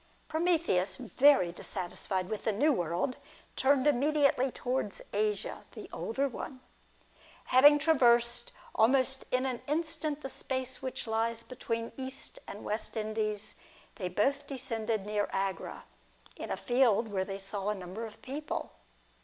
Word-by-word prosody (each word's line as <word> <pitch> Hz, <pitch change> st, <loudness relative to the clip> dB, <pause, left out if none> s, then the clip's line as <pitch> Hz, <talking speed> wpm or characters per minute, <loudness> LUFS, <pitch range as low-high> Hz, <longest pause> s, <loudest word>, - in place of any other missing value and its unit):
Prometheus, 315 Hz, -, +2 dB
very 255 Hz, -6 st, +4 dB
dissatisfied 185 Hz, +1 st, -3 dB
with 215 Hz, +1 st, -4 dB
the 220 Hz, -, +3 dB
New 285 Hz, +9 st, +3 dB
World, 175 Hz, -, -1 dB, 0.4 s
turned 270 Hz, 0 st, +3 dB
immediately 285 Hz, -1 st, +3 dB
towards 250 Hz, -5 st, -2 dB
Asia, 210 Hz, 0 st, 0 dB
the -, -, -8 dB
older 270 Hz, +5 st, -1 dB
one. 260 Hz, 0 st, -7 dB, 0.9 s
Having 290 Hz, +3 st, +7 dB
traversed 240 Hz, -6 st, +3 dB, 0.2 s
almost 265 Hz, +3 st, +3 dB
in 255 Hz, +1 st, +1 dB
an 255 Hz, -3 st, -2 dB
instant 305 Hz, -1 st, -1 dB
the 270 Hz, -, -5 dB
space 260 Hz, -1 st, -2 dB
which 260 Hz, -, -4 dB
lies 230 Hz, +1 st, 0 dB
between 230 Hz, -2 st, -4 dB
the -, -, -9 dB
East 260 Hz, 0 st, -6 dB
and 205 Hz, -, -8 dB
West 220 Hz, +2 st, -3 dB
Indies, 215 Hz, -1 st, -2 dB, 0.4 s
they 185 Hz, -4 st, -2 dB
both 275 Hz, +10 st, +1 dB
descended 230 Hz, -6 st, -2 dB
near 210 Hz, 0 st, 0 dB
Agra, 195 Hz, -1 st, -3 dB, 0.5 s
in -, -, -6 dB
a -, -, -1 dB
field 240 Hz, -3 st, +3 dB
where 190 Hz, -2 st, 0 dB
they 195 Hz, 0 st, -5 dB
saw 195 Hz, +1 st, -3 dB
a 210 Hz, -, 0 dB
number 190 Hz, +4 st, -6 dB
of 220 Hz, -2 st, -9 dB
people. 290 Hz, +3 st, -4 dB
235 Hz, 140 wpm, -31 LUFS, 210-270 Hz, 0.9 s, Having